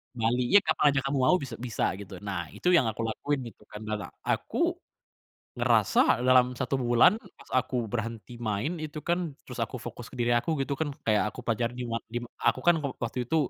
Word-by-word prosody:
Kembali. 120 +2 +1
Ya 205 +8 +6
kapan - - +1
aja - - +4
kamu 135 0 0
mau 180 - +6
bis 140 -8 -3
bisa 120 -3 -1
gitu. 95 -1 -8
Nah, 95 -4 -3
itu 180 - +1
yang 160 -10 +5
aku 110 +1 -2
lakuin 135 +5 -1
gitu 105 - -23
kan 105 - -9
da 110 0 -3
la - - -6 0.2
aku - - 0 0.9
ngerasa - - +3
dalam 125 0 +6
1 130 +1 -1
bulan, 120 - +5 0.2
pas - - -16
aku 130 0 -5
berhenti 115 +1 -4
main 115 - -1
itu 155 0 -5
kan, 175 -3 0
terus 125 -2 -7
aku 125 - -8
fokus 120 0 -8
ke - - -9
diri 120 0 +2
aku 155 +7 0
gitu 135 - -1
kan 160 - +1 0.2
kayak 105 -2 +3
aku - - -8
pelajar 115 0 +1
dima 120 -2 -2 0.2
dima 120 0 -3
aku 120 +2 +2
kan 175 -1 +6 0.2
waktu 120 +1 -2
itu, 160 - +1
120 Hz, 205 wpm, -28 LUFS, 115-140 Hz, 0.9 s, Ya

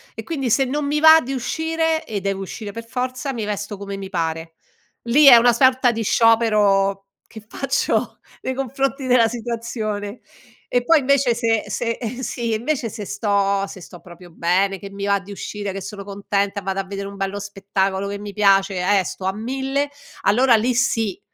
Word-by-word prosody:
e - - -6
quindi 275 -7 -3
se 265 +5 +3
non 290 +3 -2
mi 295 +1 0
va 320 +1 +8
di 265 +2 -5
uscire, 320 +4 -1
e 205 -3 -4
devo 195 0 -2
uscire 205 +2 -7
per 230 +2 -8
forza, 255 +3 -3
mi 225 -4 -4
vesto 205 0 -4
come 200 0 -6
mi 195 -1 -7
pare. 165 -2 -3 0.5
Lì 265 +6 +4
è 260 - +11
una 240 +1 +6
sorta 260 0 +4
di 225 -1 -4
sciopero 205 -4 +3 0.2
che 220 -1 -12
faccio 275 - -1 0.2
nei 260 - -3
confronti 270 +1 -2
della 245 -2 +4
situazione. 225 -2 -4 0.5
E 245 -1 +2
poi 325 +4 +5
invece, 275 -2 +2
se 225 -2 +1
se 230 -1 -2 0.2
sì, 235 -2 -3
invece 240 +2 -1
se 215 -1 -7
sto 200 -1 0
se 190 - -10
sto 175 0 -12
proprio 175 0 -14
bene, 185 +4 0
che 200 - -8
mi 200 0 -5
va 200 0 +2
di 195 +1 -12
uscire, 205 0 -5
che 195 0 -6
sono 200 +1 -7
contenta, 200 0 -2
vado 195 0 -3
a - - -1
vedere 200 0 -6
un 200 - -9
bello 195 +1 -3
spettacolo 195 -1 -2
che 200 0 -4
mi 205 0 -8
piace, 195 -1 +3 0.2
e - - 0
sto 185 - -6
a 190 - 0
mille, 270 +6 -2 0.3
allora 240 +3 +4
lì 240 +3 +1
sì, 225 -5 0
215 Hz, 190 wpm, -21 LUFS, 195-250 Hz, 0.5 s, è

